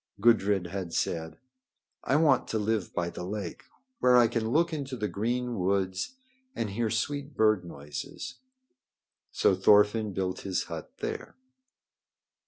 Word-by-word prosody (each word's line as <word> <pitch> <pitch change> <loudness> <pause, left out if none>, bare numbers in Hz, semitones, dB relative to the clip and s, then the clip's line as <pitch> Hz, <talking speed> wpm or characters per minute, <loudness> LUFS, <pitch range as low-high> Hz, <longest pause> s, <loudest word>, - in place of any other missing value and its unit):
Gudrid 100 -4 +4
had 90 -3 -4
said: 80 -1 -2 0.7
"I 135 - +1
want 150 -3 +4
to 110 - -1
live 105 -2 -1
by 85 0 -2
the 85 - -6
lake 95 -2 -5 0.3
where 125 -1 +6
I 120 -1 +7
can 115 -1 -1
look 165 +6 +2
into 135 -4 -4
the 105 -2 -1
green 120 +2 -2
woods 95 - 0 0.4
and 110 -3 -2
hear 115 +2 0
sweet 140 +6 -2
bird 110 -4 +4
noises." 80 - -7 0.9
So - - +3
Thorfinn 105 +3 +4
built 95 -1 -2
his 95 -3 -1
hut - - -7
there. - - -4
105 Hz, 140 wpm, -29 LUFS, 95-120 Hz, 0.9 s, I